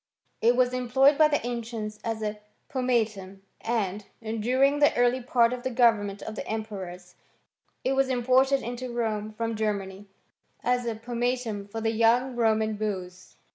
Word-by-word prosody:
It 235 +2 +4
was 250 0 +2
employed 260 +3 +4
by 310 +1 +6
the 290 -5 -1
ancients 225 -3 -4
as 225 -1 -3
a 210 0 -3 0.3
pomatum; 215 -7 -1 0.2
and, 210 -3 -1 0.2
during 250 +6 +1
the 290 - +4
early 245 +1 +3
part 240 -1 +3
of 250 - -5
the 260 - -2
government 220 -5 +2
of 220 - -6
the - - -6
emperors, 190 -5 -6 0.7
it 260 - +1
was 270 0 +2
imported 260 +2 +3
into 245 +1 -5
Rome 215 -3 -2
from 225 +1 -3
Germany, 200 -2 -3 0.6
as 245 0 +1
a 230 - -1
pomatum 235 -2 -2
for 225 +2 -6
the 225 0 +1
young 235 +3 +2
Roman 220 -2 +1
beaus. 185 -4 -5
230 Hz, 155 wpm, -27 LUFS, 215-250 Hz, 0.7 s, by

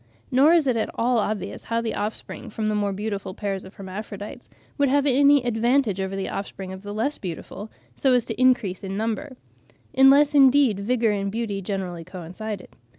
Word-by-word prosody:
Nor 280 +6 +5
is 335 -4 +4
it 255 -3 +2
at 220 - -1
all 240 0 +2
obvious 205 -2 -3
how 230 0 0
the 230 -1 -2
offspring 220 +3 -4
from 215 0 -2
the - - 0
more 205 -1 0
beautiful 200 -1 -4
pairs 195 -2 -3
of 190 - -13
hermaphrodites 200 +1 -8 0.3
would 280 -1 +3
have 285 +1 +2
any 280 0 +5
advantage 235 -3 +1
over 190 0 -3
the 195 -1 -3
offspring 195 -1 -5
of 190 - -9
the 205 0 -7
less 225 +8 -2
beautiful, 195 +4 -7 0.3
so 265 -2 +2
as 245 -2 +3
to 225 +2 -4
increase 240 -8 +2
in 195 0 -4
number, 235 +5 -3 0.6
unless 280 +2 +6
indeed 270 -6 +5
vigour 225 +1 +1
and 200 -1 -2
beauty 215 -3 -3
generally 185 -3 -4
coincided. 185 +4 -7
215 Hz, 185 wpm, -24 LUFS, 195-255 Hz, 0.6 s, unless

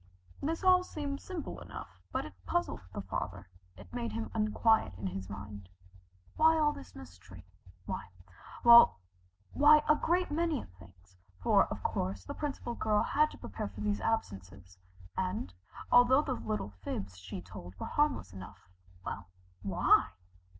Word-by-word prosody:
This 325 +5 -2
all 365 -1 +6
seemed 285 -5 -5
simple 335 - -6
enough, 90 0 -10
but - - -2
it 100 - -9
puzzled - - -1
the 100 - -5
father, 95 0 -5 0.3
it - - -14
made 235 -2 -3
him 225 0 -4
unquiet 215 - +2
in 100 - -6
his 95 0 -4
mind. 100 -1 -8 0.7
Why 320 +1 +5
all 300 -1 +3
this 90 - -12
mystery? 90 +1 -13 0.4
Why - - -5 0.5
well, 235 - +9 0.6
why 300 +1 +7
a 305 - +6
great 350 +2 0
many 320 -2 0 0.2
things, 90 0 -18 0.3
for - - +5
of - - -7
course 95 0 -2
the - - -5
Principal 280 -5 -4
Girl 215 -2 +1
had 305 +1 +2
to - - -12
prepare 100 0 -5
for 100 +1 -9
these 105 -1 -1
absences, 95 - -3 0.4
and, 185 - -2 0.4
although 255 +4 +6
the 270 - -1
little 215 - -3
fibs 95 -2 -5
she 90 0 -7
told 90 0 -10
were - - -4
harmless 295 - 0
enough 95 0 -11 0.3
well, 100 - -5 0.3
why? 95 -2 +3
105 Hz, 150 wpm, -32 LUFS, -, 0.7 s, well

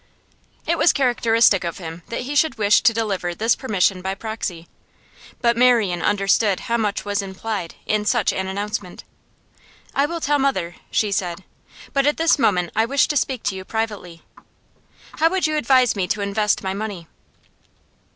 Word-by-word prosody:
It 335 0 0
was - - +5
characteristic 230 -6 +3
of 170 -1 -4
him 165 -1 -8
that 235 - -4
he 265 +4 -5
should 315 -1 +2
wish 210 -1 +4
to 240 - +5
deliver 200 -6 -2
this 225 +5 +2
permission 195 -6 0
by 190 +1 -3
proxy. 200 -6 -5 0.7
But 235 -2 +3
Marian 230 -8 +3
understood 200 0 +2
how 235 -1 -1
much 210 -3 -2
was 205 0 -1
implied 195 -2 -5
in 210 0 0
such 225 -2 +2
an 190 0 -3
announcement. 200 -1 -5 0.9
'I 280 +1 +2
will 335 +2 -4
tell 290 -2 +1
mother,' 190 -11 -1
she 210 -2 0
said. 180 -1 -2 0.5
'But 275 0 +2
at 295 - +2
this 325 -2 +3
moment 180 -8 +1
I 220 - +3
wished 280 +6 +2
to - - -4
speak 260 -3 -1
to 200 - -1
you 190 - -6
privately. 205 -6 -5 1.0
How 325 +1 +4
would 375 0 0
you 310 0 0
advise 255 -4 +3
me 190 -3 -1
to 205 +3 -1
invest 205 +1 0
my 190 0 -2
money? 200 -4 -5
215 Hz, 170 wpm, -21 LUFS, 190-250 Hz, 1.0 s, was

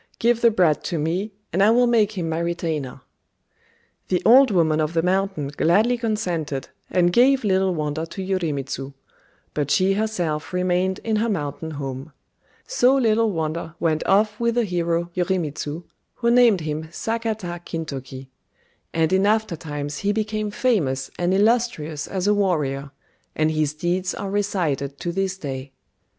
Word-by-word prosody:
Give 235 0 +2
the 235 - +6
brat 180 -8 +2
to 170 - -2
me, 175 +8 -1 0.2
and 190 - +2
I 205 - +6
will 245 +2 +5
make 220 -3 +3
him 180 -5 -3
my 160 0 -1
retainer." 160 -6 -3 1.1
The 180 - 0
Old 255 +4 +7
Woman 160 -5 +2
of 155 +2 -2
the 165 - +2
Mountain 190 -5 0
gladly 200 +11 +2
consented, 180 - -2 0.2
and 175 -1 +2
gave 260 +3 +4
"Little 190 -2 +2
Wonder" 155 +1 -2
to 190 +3 -6
Yorimitsu; 140 -7 -3 0.6
but 145 -2 -1
she 190 +5 +3
herself 180 -8 -2
remained 180 +1 +1
in 220 -1 0
her 230 +2 0
mountain 160 -4 -3
home. 135 +1 -6 0.5
So 270 - +3
"Little 225 -3 +2
Wonder" 165 -1 -3
went 155 -2 +1
off 210 +2 +3
with 235 0 +1
the 240 - +3
hero 170 -3 -1
Yorimitsu, 170 -3 -2 0.3
who 235 -1 +1
named 235 -6 +5
him 155 0 -3
Sakata 215 -1 -3
Kintoki; 135 -6 -6 0.7
and 165 +2 +2
in 190 +2 +3
aftertimes 160 -9 -2
he 200 - +1
became 215 0 -2
famous 195 - 0
and 175 +1 +1
illustrious 195 -8 +1
as 190 -1 -3
a 205 - +4
warrior, 150 -9 0 0.5
and 155 0 +2
his 155 -1 0
deeds 180 +4 -1
are 200 -1 -4
recited 165 -9 -1
to 175 - -3
this 190 +1 -2
day. 135 -5 -6
180 Hz, 155 wpm, -23 LUFS, 155-210 Hz, 1.1 s, Old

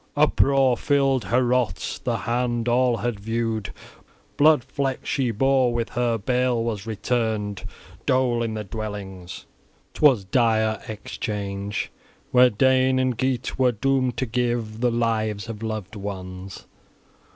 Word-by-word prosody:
Uproar 135 -3 +3
filled 135 -5 +1
Heorot; 125 +2 0
the - - 0
hand 120 0 -1
all 120 0 +3
had 115 -1 -3
viewed, 115 0 -2 0.6
blood 150 -3 +5
flecked, 135 +1 -3
she 130 -3 0
bore 130 +2 +2
with 120 -1 -2
her; 120 -2 0
bale 125 +2 0
was 110 -2 -3
returned, 110 -2 -2 0.4
dole 130 -2 +2
in 115 -1 -2
the 105 - -3
dwellings: 100 -3 -7 0.5
'twas 135 -9 +4
dire 110 0 +1
exchange 100 -2 -4 0.4
where 125 0 +6
Dane 130 +3 +3
and 130 -1 +1
Geat 130 +1 -2
were 125 -2 +4
doomed 130 +1 0
to 130 - 0
give 120 -2 -2
the 125 - +3
lives 110 -3 -1
of 115 -2 -7
loved 110 -2 -4
ones. 95 -2 -7
115 Hz, 130 wpm, -24 LUFS, 105-125 Hz, 0.6 s, where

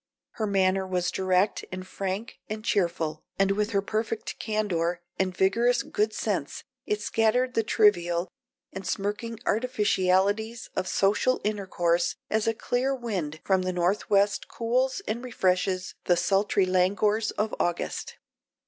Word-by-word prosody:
Her 215 - -2
manner 190 -1 +2
was 180 -1 0
direct 185 +2 +1
and 185 0 -6
frank 195 +4 -4
and 215 +1 -5
cheerful, 170 -7 0
and 195 0 +3
with 210 +1 0
her 200 -3 +1
perfect 220 +1 -3
candor 180 -6 -1 0.2
and 185 -2 0
vigorous 235 +6 +3
good 215 +1 0
sense 205 -9 -3 0.2
it 210 0 0
scattered 245 +4 +2
the 225 - +3
trivial 175 -5 +3 0.5
and 190 -1 -6
smirking 210 +4 -2
artificialities 210 -1 +1
of 185 - -1
social 210 +6 +2
intercourse 185 -5 0 0.2
as 220 0 +1
a 225 - +2
clear 255 +4 0
wind 185 - -4
from 190 -1 +3
the 185 0 -1
north 180 +3 0
west 200 0 +2
cools 255 +8 0
and 235 +3 -2
refreshes 185 -5 0
the 175 - +3
sultry 195 +2 +2
languors 200 +4 +2
of 215 +1 -2
August. 175 0 -2
200 Hz, 140 wpm, -27 LUFS, 185-220 Hz, 0.5 s, and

